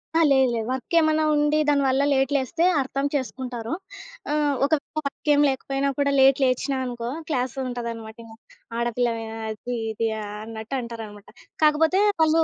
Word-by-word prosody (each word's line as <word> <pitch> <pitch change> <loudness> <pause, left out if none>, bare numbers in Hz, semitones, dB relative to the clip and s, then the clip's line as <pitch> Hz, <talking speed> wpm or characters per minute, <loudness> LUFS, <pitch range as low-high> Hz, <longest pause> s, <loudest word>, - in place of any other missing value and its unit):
ఆ! - - +5
లేదు 265 -2 +4
లేదు. 225 -1 -2
వర్క్ 260 +6 -5
ఏమన్నా 315 0 +2
ఉండి 295 +1 +2
దాని 285 -1 +3
వల్ల 265 +1 +2
లేట్ 270 0 +1
లేస్తే 280 +5 +1 0.2
అర్థం 275 +1 -2
చేసుకుంటారు. 250 -3 -4 0.6
ఆహ్, 295 -1 +2
ఒకవేళ 295 0 +1 0.2
వర్క్ 280 +2 -4
ఏం 290 - +4
లేకపోయినా 270 +1 -1
కూడా 280 0 +2
లేట్ 270 0 +6
లేచినా 265 +2 +1
అనుకో, 240 -1 -4 0.2
క్లాస్ 255 -4 -1
ఉంటదనమాట 230 -3 -5
ఇంగ. 225 -1 -13 0.4
ఆడపిల్లవేనా? 230 -1 -1
అది 240 +3 -5 0.2
ఇది 225 +1 -1 0.2
అన్నట్టు 220 +4 -6
అంటారన్నమాట. 220 -3 -9 0.3
కాకపోతే 320 +5 +4 0.2
వాళ్ళు 320 +1 +4
260 Hz, 150 wpm, -24 LUFS, 230-285 Hz, 0.6 s, లేట్